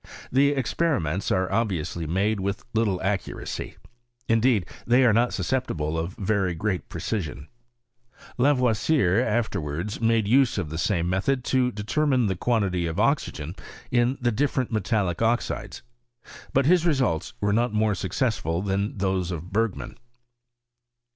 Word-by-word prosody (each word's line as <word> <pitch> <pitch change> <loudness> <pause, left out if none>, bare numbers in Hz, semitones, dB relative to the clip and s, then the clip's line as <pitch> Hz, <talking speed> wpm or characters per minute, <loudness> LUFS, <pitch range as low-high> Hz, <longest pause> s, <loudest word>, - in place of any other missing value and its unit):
The 140 +2 +4
experiments 130 - 0
are 95 0 +1
obviourif 90 -7 -1
made 100 +4 +1
with 100 +1 -3
little 110 -5 +1
accuracy: 95 0 -3 0.5
indeed 115 -3 +3 0.2
they 125 +2 +5
are 115 - +5
not 120 +3 +3
susceptible 80 -13 -1
of 80 +3 -3
very 95 -3 0
great 95 +2 -2
precision. 85 - -4 0.9
lavoisier 125 - +3
after 110 -5 0
wards 80 +10 -4
made 115 -2 +2
use 130 +1 +3
of 85 -6 -3
the 80 - -4
same 85 -2 0
method 110 +9 0
to 125 -1 +3
determine 125 +4 +1
the 95 -2 0
quantity 95 -5 0
of 80 - -3
oxygen - - 0 0.4
in 120 +2 +2
the 120 -1 +1
different 130 +1 0
metallic 105 -4 0
oxides; 115 +1 -1 0.7
but 135 0 +2
his 175 +2 +4
results 130 - 0
were 100 0 +1
not 120 +3 +2
more 105 0 +2
successftit 95 - -1
than 100 +2 -1
those 95 -2 0
of 85 +1 -6
Bergman. 110 0 -2
105 Hz, 135 wpm, -25 LUFS, 90-120 Hz, 0.9 s, they